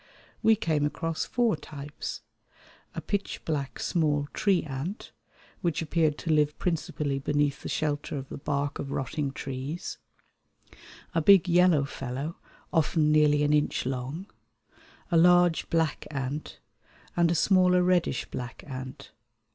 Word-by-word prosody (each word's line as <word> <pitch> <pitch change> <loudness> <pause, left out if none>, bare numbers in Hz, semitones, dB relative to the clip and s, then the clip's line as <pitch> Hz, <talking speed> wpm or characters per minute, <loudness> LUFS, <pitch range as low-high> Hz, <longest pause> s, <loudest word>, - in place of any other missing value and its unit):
We 225 - +5
came 155 -7 0
across 165 +2 -1
four 235 -5 +1
types, 145 -1 -7 0.7
a - - -3
pitch 200 -1 -3
black 145 -4 -2
small 150 -4 +1
tree 195 -4 +2
ant, 150 - -5 0.5
which 170 -3 0
appeared 160 -2 +1
to 165 - -2
live 150 -1 +2
principally 150 -5 -1
beneath 145 0 0
the - - -6
shelter 150 -1 -2
of 135 -1 -6
the - - -7
bark 145 0 -2
of 140 - -4
rotting 140 +1 -2
trees; 135 +4 -5 1.1
a 165 - +2
big 190 +2 +6
yellow 175 -4 +4
fellow 135 +4 -5 0.4
often 155 -1 +3
nearly 150 -1 +4
an 145 0 +3
inch 150 -4 +1
long, 130 +7 -3 0.9
a 170 - +4
large 175 0 +5
black 160 -3 0
ant, 140 +1 -4 0.6
and 170 -1 +3
a 170 - +1
smaller 180 +1 +4
reddish 180 -7 +1
black 125 0 -6
ant. 130 -2 -8
150 Hz, 135 wpm, -28 LUFS, 140-170 Hz, 1.1 s, big